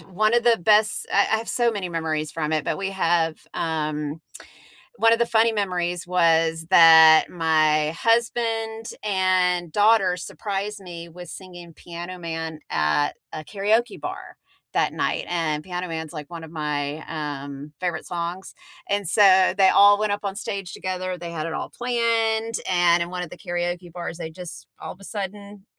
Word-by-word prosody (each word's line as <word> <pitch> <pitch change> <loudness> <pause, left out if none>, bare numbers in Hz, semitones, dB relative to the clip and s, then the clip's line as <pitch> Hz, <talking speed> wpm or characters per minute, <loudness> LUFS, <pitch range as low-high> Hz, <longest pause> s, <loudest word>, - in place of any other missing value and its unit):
one 215 +7 0
of 240 - +3
the 235 -1 +4
best 215 +3 +3
I 200 - +4
I 220 - +2
have 225 +1 -6
so 240 -1 +2
many 200 -5 -4
memories 160 -2 -3
from 155 -1 -2
it, 155 -1 0
but - - -1
we 195 0 -3
have, 170 -4 +1 0.2
um 155 -1 -3 0.8
one 230 0 +5
of 230 - 0
the 235 - +3
funny 230 0 +3
memories 180 -4 -2
was 165 -2 +2
that 160 -1 +8
my 155 -2 +2
husband 225 +1 0
and 185 -4 +1
daughter 205 -3 +4
surprised 200 +2 -5
me 170 -2 -9
with 175 0 -11
singing 175 -3 -10
Piano 175 +2 -8
Man 160 -2 -5
at 75 - +1 0.2
a 155 - -6
karaoke 210 +8 0
bar - - -7 0.4
that - - +1
night, - - -1
and 155 -3 -1
Piano 180 -1 -5
Man's, 160 -1 -5
like, 150 -3 -8
one 165 -1 -8
of 160 - -14
my, 150 -2 -3
um, 145 -2 -6
favorite 180 -1 -3
songs, 175 +2 -5 0.4
and 200 -3 0
so 190 -1 +5
they 190 -1 +6
all 205 0 +6
went 210 -1 0
up 205 0 -3
on 195 0 -3
stage 195 -3 -5
together, 185 -1 -4
they 170 0 -7
had 155 -1 -4
it 165 - -4
all - - -4
planned, 230 -2 0
and 175 -1 +3
in 170 - -2
one 180 -1 -4
of 170 - -8
the - - -11
karaoke 175 0 -4
bars, 170 -1 -6
they 165 -2 -6
just 175 +1 -9
all - - -7
of 185 - -14
a - - -15
sudden 200 0 -7
180 Hz, 175 wpm, -23 LUFS, 160-205 Hz, 0.8 s, that